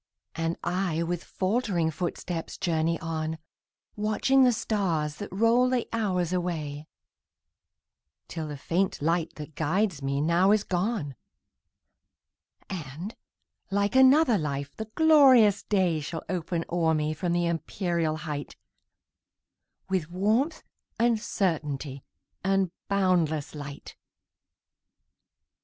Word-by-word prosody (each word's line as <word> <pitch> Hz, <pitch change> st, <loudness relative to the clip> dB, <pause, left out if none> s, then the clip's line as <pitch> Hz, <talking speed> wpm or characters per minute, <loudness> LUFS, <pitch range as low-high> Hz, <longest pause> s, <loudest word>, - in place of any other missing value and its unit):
And 165 Hz, +1 st, -2 dB
I, 175 Hz, -2 st, 0 dB
with 170 Hz, 0 st, -3 dB
faltering 185 Hz, -5 st, 0 dB
footsteps, 170 Hz, 0 st, -4 dB
journey 165 Hz, -1 st, 0 dB
on, 160 Hz, -1 st, -3 dB, 0.6 s
Watching 215 Hz, +6 st, +3 dB
the 250 Hz, -, +6 dB
stars 185 Hz, -10 st, -1 dB
that 205 Hz, -, -7 dB
roll 230 Hz, +6 st, +3 dB
the 250 Hz, -2 st, 0 dB
hours 185 Hz, -6 st, 0 dB
away, 155 Hz, -5 st, -3 dB, 1.4 s
Till 160 Hz, -2 st, -5 dB
the 145 Hz, -1 st, -6 dB
faint 180 Hz, +7 st, 0 dB
light 165 Hz, +2 st, 0 dB
that 150 Hz, +1 st, -8 dB
guides 165 Hz, +2 st, 0 dB
me 140 Hz, 0 st, -1 dB
now 170 Hz, +6 st, +3 dB
is 215 Hz, -1 st, +2 dB
gone, 180 Hz, -, -1 dB, 1.5 s
And, 170 Hz, -, -6 dB, 0.5 s
like 200 Hz, +3 st, 0 dB
another 265 Hz, -3 st, +6 dB
life, 140 Hz, -2 st, -4 dB
the 220 Hz, -, -5 dB
glorious 265 Hz, -10 st, +6 dB
day 185 Hz, -6 st, +1 dB
Shall 160 Hz, +2 st, -5 dB
open 170 Hz, -2 st, -2 dB
o'er 165 Hz, -2 st, +2 dB
me 155 Hz, 0 st, 0 dB
from 175 Hz, +3 st, -2 dB
the 175 Hz, 0 st, +1 dB
empyreal 170 Hz, -1 st, -1 dB
height, 150 Hz, -2 st, -5 dB, 1.3 s
With 185 Hz, -4 st, -1 dB
warmth, 220 Hz, -, 0 dB, 0.3 s
and 235 Hz, -1 st, +3 dB
certainty, 150 Hz, -9 st, -2 dB, 0.4 s
and 195 Hz, -2 st, +1 dB, 0.2 s
boundless 180 Hz, -7 st, +1 dB
light. 145 Hz, -2 st, -8 dB
175 Hz, 110 wpm, -27 LUFS, 155-205 Hz, 1.5 s, the